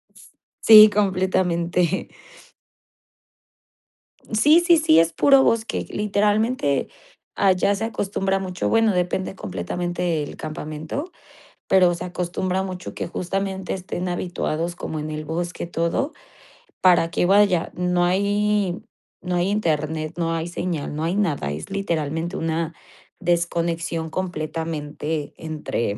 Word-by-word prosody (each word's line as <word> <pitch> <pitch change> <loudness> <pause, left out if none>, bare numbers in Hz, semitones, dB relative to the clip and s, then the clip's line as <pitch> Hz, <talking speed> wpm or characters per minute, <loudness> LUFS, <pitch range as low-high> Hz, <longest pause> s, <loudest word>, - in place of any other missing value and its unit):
S - - -17 0.3
sí, 215 -1 +9
completamente. 185 -3 0 2.3
Sí, 295 +10 +6
sí, 340 -2 +6
sí, 165 - +5
es 165 0 +2
puro 275 -1 +5
bosque. 230 0 0
Literalmente, 210 - +1 0.5
allá 195 +1 +3
se 220 +3 -2
acostumbra 195 -3 -1
mucho, 185 -1 -3
bueno, 225 -2 +3
depende 180 +1 -1
completamente 170 - -3
el - - -8
campamento, 155 - -5 0.6
pero 180 -2 +5
se - - -6
acostumbra 180 +1 -2
mucho 185 -1 -6
que - - -4
justamente 190 +2 -3
estén 180 -1 -4
habituados 175 -1 -2
como 160 -3 -5
en 155 +1 -4
el 155 0 -5
bosque 175 +3 -4
todo, 170 - -1 0.7
para 175 -2 +5
que, 175 - 0
vaya, 195 -3 +3
no 180 0 +1
hay 200 0 +1 0.4
no 180 -1 -2
hay 175 +2 +1
Internet, 155 -5 -1
no 165 -1 0
hay 165 +1 -2
señal, 170 -4 -3
no 155 - -3
hay 170 +4 0
nada, 150 - 0
es 75 +2 -6
literalmente 165 -2 -2
una 165 0 -2 0.5
desconexión 170 -2 -1
completamente 155 -3 -4
entre 150 -9 -3
175 Hz, 120 wpm, -22 LUFS, 160-195 Hz, 2.3 s, sí